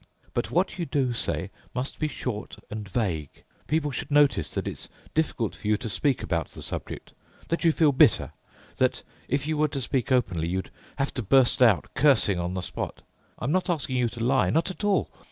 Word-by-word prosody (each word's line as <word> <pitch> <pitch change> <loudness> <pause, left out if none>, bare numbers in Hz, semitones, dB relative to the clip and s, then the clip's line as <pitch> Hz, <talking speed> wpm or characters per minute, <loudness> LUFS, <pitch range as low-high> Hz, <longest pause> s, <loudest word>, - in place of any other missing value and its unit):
But - - -1
what 180 - 0
you 170 - -2
do 135 -5 +1
say 85 -4 -2 0.2
must 130 +2 -3
be 155 - +1
short 120 -7 -5 0.2
and 105 -2 -5
vague. 90 - -2 0.2
People 150 -1 +1
should 135 - -4
notice 145 - +4
that - - -2
it's - - -5 0.2
difficult 135 -8 0
for - - -7
you 105 0 +3
to 115 - -5
speak 135 +5 +1
about 85 -3 -1
the - - -9
subject, - - -6 0.4
that 170 - -1
you 165 - +6
feel 155 -2 +4
bitter, 130 - +4 0.5
that, 130 -1 +1 0.2
if 140 +2 0
you 155 0 -1
were 155 - +4
to 140 -1 -4
speak 130 0 -1
openly, 90 -11 +2
you'd 95 +2 -3 0.2
have 140 0 -1
to 125 - -2
burst 125 +4 +4
out 115 -7 +4
cursing 130 -10 +4
on 90 +1 -2
the 95 - -2
spot. - - -5 0.3
I'm 125 - -2
not 185 +2 +1
asking 145 -6 0
you 120 -1 +2
to 115 0 -5
lie, 130 +2 +3
not 165 +5 +1
at 190 - -9
all. 205 -1 +2
130 Hz, 205 wpm, -26 LUFS, 105-150 Hz, 0.5 s, you